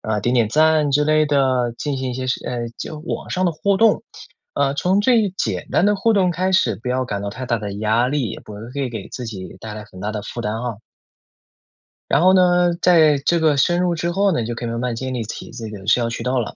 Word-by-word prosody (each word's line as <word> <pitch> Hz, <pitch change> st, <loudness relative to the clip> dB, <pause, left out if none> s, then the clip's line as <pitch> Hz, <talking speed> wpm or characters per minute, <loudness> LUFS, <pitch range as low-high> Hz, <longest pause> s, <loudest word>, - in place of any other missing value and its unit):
呃， 105 Hz, -2 st, -2 dB
点 120 Hz, -, +1 dB
点 115 Hz, -4 st, +3 dB
赞 155 Hz, +2 st, +3 dB
之 145 Hz, +2 st, +3 dB
类 155 Hz, 0 st, +3 dB
的， 130 Hz, -4 st, +1 dB
进 145 Hz, 0 st, -3 dB
行 130 Hz, -1 st, -3 dB
一 -, -, -6 dB
些 130 Hz, +1 st, -4 dB
是 130 Hz, -, -1 dB
呃， 120 Hz, -1 st, -3 dB
就 155 Hz, -, -6 dB
网 155 Hz, -, -5 dB
上 185 Hz, 0 st, -1 dB
的 175 Hz, -, +2 dB
互 200 Hz, +5 st, +1 dB
动。 220 Hz, 0 st, +3 dB, 0.5 s
呃， 140 Hz, 0 st, +1 dB
从 185 Hz, +6 st, +2 dB
最 220 Hz, -3 st, +3 dB
简 -, -, -2 dB
单 195 Hz, -, +3 dB
的 210 Hz, -, +3 dB
互 220 Hz, +3 st, +2 dB
动 185 Hz, -3 st, +2 dB
开 185 Hz, +3 st, 0 dB
始， 185 Hz, -, +2 dB
不 125 Hz, -, -4 dB
要 130 Hz, +1 st, 0 dB
感 100 Hz, -4 st, -4 dB
到 100 Hz, -, -3 dB
太 130 Hz, +4 st, -7 dB
大 115 Hz, -1 st, 0 dB
的 105 Hz, -1 st, -5 dB
压 110 Hz, +4 st, +1 dB
力， 135 Hz, -4 st, -1 dB
也 -, -, -7 dB
不 105 Hz, -, -11 dB
会 105 Hz, -, -9 dB
会 140 Hz, -2 st, -1 dB
给 110 Hz, -4 st, -6 dB
自 125 Hz, -, -7 dB
己 95 Hz, -5 st, -7 dB
带 110 Hz, -, -7 dB
来 105 Hz, 0 st, -7 dB
很 95 Hz, -3 st, -13 dB
大 105 Hz, +2 st, -2 dB
的 105 Hz, -1 st, -4 dB
负 120 Hz, -, -6 dB
担 105 Hz, -2 st, -2 dB
啊。 120 Hz, -2 st, -3 dB, 1.4 s
然 140 Hz, -, +4 dB
后 185 Hz, +2 st, +6 dB
呢， 180 Hz, -1 st, +4 dB
在 160 Hz, -5 st, +5 dB
这 170 Hz, -, +3 dB
个 155 Hz, -3 st, +3 dB
深 175 Hz, +6 st, +2 dB
入 180 Hz, -1 st, +1 dB
之 170 Hz, +1 st, -2 dB
后 195 Hz, +1 st, +2 dB
呢， 120 Hz, -, 0 dB
你 -, -, -3 dB
就 120 Hz, -, -3 dB
可 120 Hz, +1 st, -5 dB
以 -, -, -2 dB
慢 115 Hz, -, -3 dB
慢 125 Hz, -2 st, -2 dB
建 130 Hz, +1 st, -4 dB
立 120 Hz, -2 st, -2 dB
起 110 Hz, -, -7 dB
这 115 Hz, -2 st, -7 dB
个 100 Hz, -1 st, -10 dB
社 120 Hz, +2 st, +4 dB
交 115 Hz, -, 0 dB
渠 115 Hz, 0 st, -5 dB
道 125 Hz, +1 st, 0 dB
了。 110 Hz, -, -6 dB
130 Hz, 290 characters per minute, -20 LUFS, 115-170 Hz, 1.4 s, 后